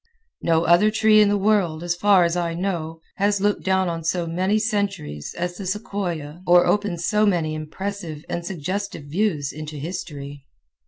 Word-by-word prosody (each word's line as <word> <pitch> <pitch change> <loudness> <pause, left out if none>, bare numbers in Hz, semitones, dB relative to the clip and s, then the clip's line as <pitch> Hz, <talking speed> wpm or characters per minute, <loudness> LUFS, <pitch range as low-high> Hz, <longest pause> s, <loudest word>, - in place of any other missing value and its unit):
No 165 -1 +2
other 175 +5 +5
tree 215 0 +5
in 210 - +5
the 205 - +2
world, 195 -6 +1
as 175 0 0
far 190 +1 +4
as 170 0 +1
I 170 -1 -1
know, 165 -3 -3 0.2
has 200 0 +2
looked 205 +1 0
down 190 -1 +2
on 165 -1 -3
so 170 +1 0
many 185 +5 0
centuries 200 - -2
as 175 +1 -3
the 195 - -6
sequoia 180 -6 -4
or 175 0 +6
opens 195 -5 0
so 210 0 +2
many 170 -7 +1
impressive 160 0 -5
and 170 - -3
suggestive 185 +1 -4
views 150 -2 -1
into 155 0 -7
history. 145 -3 -7
175 Hz, 170 wpm, -23 LUFS, 160-200 Hz, 0.2 s, or